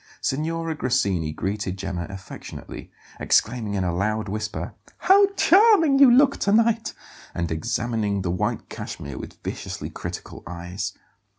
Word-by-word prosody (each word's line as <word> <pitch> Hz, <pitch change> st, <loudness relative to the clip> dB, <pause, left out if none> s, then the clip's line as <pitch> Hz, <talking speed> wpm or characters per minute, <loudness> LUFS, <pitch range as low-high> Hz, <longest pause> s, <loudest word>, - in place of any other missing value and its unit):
Signora 165 Hz, +3 st, -1 dB
Grassini 100 Hz, -, 0 dB
greeted 95 Hz, +3 st, -3 dB
Gemma 95 Hz, -2 st, -4 dB
affectionately, 95 Hz, -1 st, -9 dB, 0.3 s
exclaiming 110 Hz, -3 st, +1 dB
in 95 Hz, -, 0 dB
a 90 Hz, -1 st, -1 dB
loud 105 Hz, +4 st, -1 dB
whisper: 105 Hz, +1 st, -4 dB, 0.2 s
"How 395 Hz, +1 st, +6 dB
charming 370 Hz, -9 st, +5 dB
you 275 Hz, -2 st, +9 dB
look 270 Hz, +3 st, +5 dB
to 200 Hz, -, 0 dB
night!" 225 Hz, +1 st, +2 dB, 0.4 s
and 85 Hz, -2 st, -2 dB
examining 105 Hz, +2 st, -1 dB
the 90 Hz, -, -1 dB
white 90 Hz, -, -2 dB
cashmere 70 Hz, -2 st, -7 dB
with -, -, -9 dB
viciously -, -, -5 dB
critical -, -, -7 dB
eyes. 90 Hz, +2 st, -5 dB
110 Hz, 130 wpm, -24 LUFS, -, 0.4 s, you